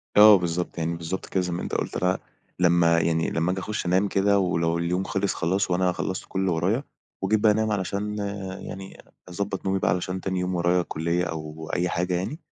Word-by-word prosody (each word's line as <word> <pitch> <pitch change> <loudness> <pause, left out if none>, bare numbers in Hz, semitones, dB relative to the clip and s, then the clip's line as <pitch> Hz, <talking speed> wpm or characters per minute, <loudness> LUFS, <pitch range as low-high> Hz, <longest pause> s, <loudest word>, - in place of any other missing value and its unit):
آه، 105 0 +10
بالضبط، 90 0 -2
يعني 85 0 -1
بالضبط 85 +3 -4
كده، 95 - 0
زي 90 -1 -2
ما 85 - -3
أنت - - -5
قُلت - - -2
ل 90 +1 +2 0.4
لمّا 85 -1 +4
يعني 80 0 +1
لمّا 80 +2 0
آجي 95 - -2
أخُش 105 +1 -4
أنام 95 +3 +2
كده، 100 +1 +3
ولو 85 -3 +1
اليوم 90 +2 0
خلِص 100 -2 -1
خلاص 95 +3 0
وأنا 90 0 +2
خلّصت 95 +1 -3
كلّ 95 - -2
اللي 95 -1 +1
ورايا، 95 - +1 0.4
وجيت 105 +3 +2
بقى 105 0 +5
أنام 110 +1 +1
علشان 105 +1 -2 0.4
يعني 95 0 -8 0.3
أضبّط 100 +2 -4
نومي 95 0 +1
بقى 85 - +2
عشان 90 0 -3
تاني 95 -1 -2
يوم 90 0 -1
ورايا 90 +1 +2
كلّية 85 +1 -1
أو 80 -1 -6
أي 90 0 +1
حاجة 90 +2 -1
يعني، 95 - -2
90 Hz, 205 wpm, -25 LUFS, 85-95 Hz, 0.4 s, آه